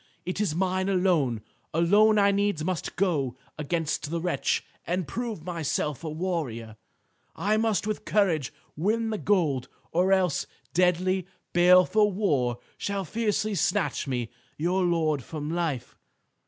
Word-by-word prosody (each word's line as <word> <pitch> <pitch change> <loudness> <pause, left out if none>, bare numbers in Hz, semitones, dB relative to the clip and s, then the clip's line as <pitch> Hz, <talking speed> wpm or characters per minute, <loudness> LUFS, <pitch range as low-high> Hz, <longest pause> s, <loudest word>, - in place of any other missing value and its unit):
It 185 +3 -2
is 180 -7 0
mine 185 +1 0
alone. 170 - +2 0.3
Alone 205 +6 +5
I 200 -1 +5
needs 200 -5 0
must 180 -1 -3
go 150 -10 0 0.2
against 155 -1 -2
the 170 +1 -1
wretch 175 +1 0 0.2
and 180 -2 -1
prove 225 - -4
myself 160 -4 -2
a 160 - -3
warrior. 150 -10 -3 0.6
I 210 +2 +1
must 220 -2 +1
with 215 0 -3
courage 175 - +1 0.2
win 220 +7 0
the 215 - -2
gold, 155 -11 +1 0.2
or 180 +3 +2
else 185 -5 +2 0.3
deadly, 180 +1 +2 0.3
baleful 180 +4 +5
war 145 - +1 0.2
shall 200 -1 -2
fiercely 215 +2 -1
snatch 175 - 0
me, 125 -3 -2 0.3
your 180 +5 +1
lord, 160 -5 +1
from 150 +1 -5
life." 160 -8 -2
180 Hz, 135 wpm, -27 LUFS, 155-200 Hz, 0.6 s, Alone